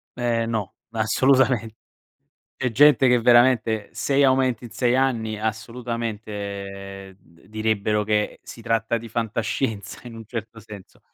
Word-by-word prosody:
Eh 120 Hz, -2 st, 0 dB
no, 110 Hz, -5 st, -3 dB, 0.2 s
assolutamen 120 Hz, +1 st, +2 dB, 0.9 s
C'è 130 Hz, -2 st, -1 dB
gente 135 Hz, +1 st, +5 dB
che 125 Hz, 0 st, +4 dB
veramente, 120 Hz, -3 st, +4 dB
6 140 Hz, 0 st, +1 dB
aumenti 130 Hz, -3 st, +2 dB
in 115 Hz, -, -9 dB
6 120 Hz, +3 st, +1 dB
anni, 115 Hz, -5 st, 0 dB
assolutamente, 105 Hz, -4 st, -5 dB
d 85 Hz, +1 st, -24 dB
direbbero 110 Hz, -1 st, 0 dB
che 105 Hz, 0 st, -1 dB
si 115 Hz, -, -11 dB
tratta 115 Hz, 0 st, 0 dB
di 115 Hz, +1 st, -10 dB
fantascienza, 110 Hz, -1 st, -3 dB
in 115 Hz, -, -9 dB
un 115 Hz, -1 st, -10 dB
certo 110 Hz, -1 st, -7 dB
senso. 105 Hz, -3 st, -13 dB
115 Hz, 130 wpm, -23 LUFS, 105-120 Hz, 0.9 s, gente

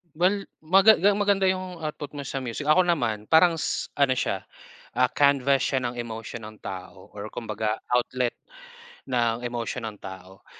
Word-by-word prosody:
Well, 195 Hz, +4 st, +2 dB, 0.2 s
maga 195 Hz, +7 st, +6 dB
ga 200 Hz, +3 st, +4 dB
maganda 200 Hz, -2 st, +2 dB
'yung 185 Hz, -2 st, -2 dB
output 150 Hz, -2 st, -5 dB
mo 145 Hz, -, -8 dB
sa 135 Hz, 0 st, -3 dB
music. 125 Hz, +5 st, -5 dB
Ako 170 Hz, +5 st, +6 dB
naman 120 Hz, -12 st, -1 dB
parang 165 Hz, +1 st, +6 dB
s 160 Hz, -, -2 dB
ano 140 Hz, -2 st, +3 dB
siya, 100 Hz, -7 st, -1 dB, 0.5 s
ah, 125 Hz, +1 st, +3 dB
canvas 140 Hz, 0 st, +3 dB
siya 130 Hz, -, +1 dB
ng 120 Hz, -, -5 dB
emotion 115 Hz, -1 st, -6 dB
ng 110 Hz, 0 st, -10 dB
tao 95 Hz, -1 st, -8 dB
or 105 Hz, +1 st, -7 dB
kumbaga 110 Hz, -1 st, -3 dB
outlet 125 Hz, 0 st, 0 dB, 0.7 s
ng 120 Hz, -2 st, +1 dB
emosyon 120 Hz, -1 st, -3 dB
ng 105 Hz, -, -10 dB
tao. 95 Hz, 0 st, -10 dB
125 Hz, 165 wpm, -26 LUFS, 110-160 Hz, 0.7 s, maga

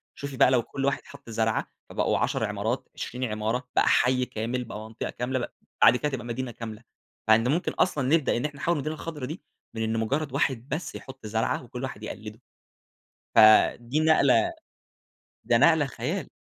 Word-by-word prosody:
شوفي 140 Hz, -2 st, -6 dB
بقى -, -, +6 dB
لو 125 Hz, -3 st, +3 dB
كل 135 Hz, +3 st, -4 dB
واحد 140 Hz, 0 st, 0 dB
حطّ 140 Hz, -3 st, -13 dB
زرعة؛ 110 Hz, 0 st, 0 dB, 0.3 s
فبقوا -, -, +1 dB
10 -, -, 0 dB
عمارات، -, -, -2 dB
20 125 Hz, +2 st, -5 dB
عمارة، 110 Hz, +2 st, -2 dB
بقى -, -, +4 dB
حيّ 125 Hz, 0 st, +3 dB
كامل، 120 Hz, +2 st, -3 dB
بقى 115 Hz, -3 st, -7 dB
منطقة 110 Hz, +1 st, -6 dB
كاملة، 130 Hz, +2 st, -2 dB
ب 120 Hz, -, -3 dB, 0.4 s
بعد 115 Hz, -, +8 dB
كده 150 Hz, -, -1 dB
تبقى 120 Hz, -4 st, -4 dB
مدينة 120 Hz, +1 st, -4 dB
كاملة. 115 Hz, 0 st, -8 dB, 0.5 s
مع 110 Hz, -, +9 dB
إن 115 Hz, +2 st, +1 dB
ممكن 170 Hz, +4 st, 0 dB
أصلًا 145 Hz, -8 st, +1 dB
نبدأ 155 Hz, -7 st, +1 dB
إن 125 Hz, -, -2 dB
إحنا 145 Hz, -1 st, -4 dB
نحوِّل 170 Hz, -, +1 dB
المدينة 155 Hz, +1 st, -3 dB
الخضرا 150 Hz, -4 st, -6 dB
دي 155 Hz, +7 st, -6 dB, 0.3 s
من 110 Hz, -, -3 dB
إن 110 Hz, 0 st, -1 dB
مجرّد 140 Hz, +7 st, -1 dB
واحد 130 Hz, 0 st, 0 dB
بس 155 Hz, +5 st, -4 dB
يحط 135 Hz, -3 st, -10 dB
زرعة، 110 Hz, +3 st, -1 dB
وكل 125 Hz, +1 st, -7 dB
واحد 120 Hz, -5 st, -6 dB
يقلِّده، 110 Hz, 0 st, -8 dB, 0.9 s
ف -, -, +3 dB, 0.4 s
دي 120 Hz, +6 st, -1 dB
نقلة 160 Hz, -, +4 dB, 0.9 s
ده -, -, +3 dB
نقلة -, -, +5 dB
خيال، -, -, -4 dB
125 Hz, 185 wpm, -27 LUFS, 115-140 Hz, 0.9 s, مع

